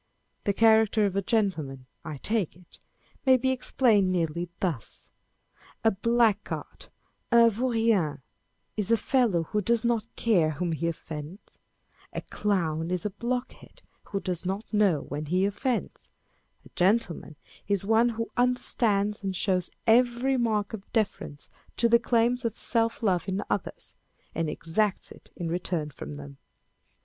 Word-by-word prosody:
The 200 - +2
character 220 0 +4
of 195 -2 -1
a 200 - +2
gentleman 165 - -1 0.2
(I 155 -2 -6
take 210 +2 -1
it) 180 0 -16 0.4
may 260 -2 +6
be 260 +1 +1
ex 255 -1 -4
plained 210 -8 +4
nearly 170 -1 -1
thus: 165 - -4 0.7
â€" - - +7
A - - -1
blackguard 225 0 0 0.4
(un 235 -1 +7
vaurien) 225 - +1 0.5
is 210 -2 -1
a 230 - +5
fellow 230 -10 +2
who 210 +6 -1
does 235 +3 +1
not 230 -2 +1
care 185 -9 +3
whom 170 +4 -2
he 165 +1 -1
offends: 160 +2 -7 0.5
a - - -3
clown 165 -6 -1
is 180 0 -2
a 210 - -1
blockhead 245 +5 -5 0.2
who 200 - -3
does 180 -3 -3
not 195 +5 -4
know 200 -8 +3
when 150 +1 -5
he 185 +4 +2
offends: 235 +5 -2 0.6
a - - -14
gentle 190 -1 +2
man - - -11 0.3
is 200 -1 0
one 225 +3 +4
who 230 0 -4
understands 225 -4 +1
and 195 -1 -3
shows 185 -1 0 0.2
every 245 +3 +3
mark 220 -4 0
of 205 -2 -8
deference 200 -10 -2 0.3
to 235 - +4
the 235 0 +5
claims 235 +2 +1
of 230 -2 -2
self 230 -1 0
love 185 -4 +1
in 190 +2 -1
others, 200 - -4 0.4
and 165 -1 -1
exacts 185 +6 -1
it - - -14
in 170 - -4
return 165 -2 -2
from 75 - -8
them. 70 -1 -10
205 Hz, 155 wpm, -27 LUFS, 175-230 Hz, 0.7 s, â€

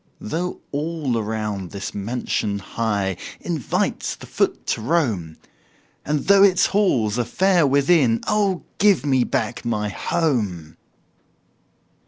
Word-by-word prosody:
Though 175 +10 -4
all 150 -3 -2
around 105 -4 -3
this 100 +2 -6
mansion 105 -1 -2
high 100 -2 -2 0.2
Invites 160 -8 -2
the - - -12
foot - - -1
to - - -1
roam, 110 - 0 0.7
And 150 0 -1
though 200 0 +6
its 190 -2 +5
halls 125 - +1
are - - +2
fair 180 +4 +2
within 140 -4 +3
Oh, 200 -4 +1 0.2
give 195 -9 +4
me 130 -3 +3
back 115 0 -2
my 105 -3 -1
HOME! 105 - -1
125 Hz, 120 wpm, -22 LUFS, 105-170 Hz, 0.7 s, though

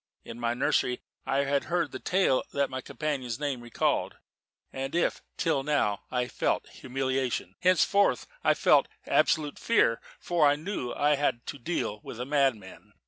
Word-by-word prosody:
In 115 - -8
my 120 0 0
nursery 125 0 +1 0.2
I 140 +1 +2
had 140 0 0
heard 170 -3 0
the 130 - -6
tale 180 -8 +2
that 140 -1 0
my 130 0 -4
companion's 135 -3 -3
name 140 -4 -2
recalled: 120 -1 -1 0.6
and 135 +3 -4
if 175 - +1 0.2
till 160 -5 +1
now 135 -8 0
I 125 - 0
had 125 - -7
felt - - 0
humiliation, 130 -6 -2
henceforth 185 +3 +3 0.2
I - - +4
felt - - +4 0.2
absolute 150 -2 +2
fear, 205 - +2 0.2
for 170 -4 +3
I 145 - +4
knew 155 -3 -4
that - - -6
I 145 +1 +3
had 130 -4 0
to 145 - -6
deal 120 -7 -2
with 120 - -9
a 125 - -3
madman. 135 -9 -1
135 Hz, 170 wpm, -28 LUFS, 125-150 Hz, 0.6 s, I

